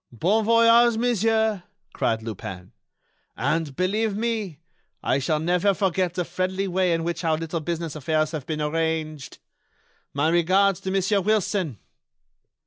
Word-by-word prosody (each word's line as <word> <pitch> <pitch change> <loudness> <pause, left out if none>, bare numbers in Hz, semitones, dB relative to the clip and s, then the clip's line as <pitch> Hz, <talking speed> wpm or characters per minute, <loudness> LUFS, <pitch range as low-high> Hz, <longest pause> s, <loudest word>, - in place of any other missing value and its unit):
"Bon 190 - +1
voyage, 230 +1 +5
monsieur," 220 -3 +1 0.3
cried 110 -1 -1
Lupin, 95 -4 -7 0.7
"and, 155 -4 -1
believe 205 +4 0
me, 220 -8 -2 0.5
I 135 - +1
shall 155 +3 0
never 180 +4 +1
forget 185 -2 0
the 180 - -1
friendly 185 +3 -2
way 185 -1 +1
in 165 0 0
which 170 +1 -3
our 160 -1 +1
little 165 +1 -3
business 165 -1 -4
affairs 155 +1 0
have 155 -5 -6
been 155 -1 -3
arranged. 155 -2 -2 0.7
My 145 +3 +1
regards 185 +3 +3
to 190 - -5
Monsieur 195 +1 +1
Wilson." 190 - 0
175 Hz, 135 wpm, -24 LUFS, 155-205 Hz, 0.7 s, voyage